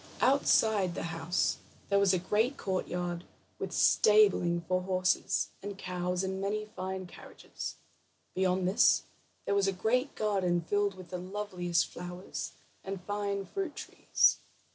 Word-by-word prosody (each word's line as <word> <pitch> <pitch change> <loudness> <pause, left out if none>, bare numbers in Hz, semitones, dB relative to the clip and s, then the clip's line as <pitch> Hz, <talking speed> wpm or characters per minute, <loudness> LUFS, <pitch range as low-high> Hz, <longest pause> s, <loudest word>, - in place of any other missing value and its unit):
Outside 220 -8 +3
the - - -3
house 165 +2 0 0.3
there 200 0 +4
was 200 -2 +4
a 185 - +3
great 215 +9 0
courtyard, 180 -2 -2 0.4
with - - -4
stabling 200 -5 +4
for 185 +2 0
horses, 185 -1 +1
and 200 0 -6
cows, 180 0 -2
and 190 0 -3
many 210 +2 -1
fine 190 -3 -5
carriages. 175 - -8 0.6
Beyond 185 -1 +1
this 190 - +4 0.4
there - - 0
was 200 -1 +3
a - - +3
great 245 +9 0
garden 190 -5 +1
filled 205 +3 0
with 185 -2 -11
the 180 - -4
loveliest 185 -2 -1
flowers, 180 +1 -6 0.3
and 190 -1 -5
fine 200 0 -2
fruit 380 - -4
trees. - - +2
190 Hz, 140 wpm, -31 LUFS, 180-205 Hz, 0.6 s, there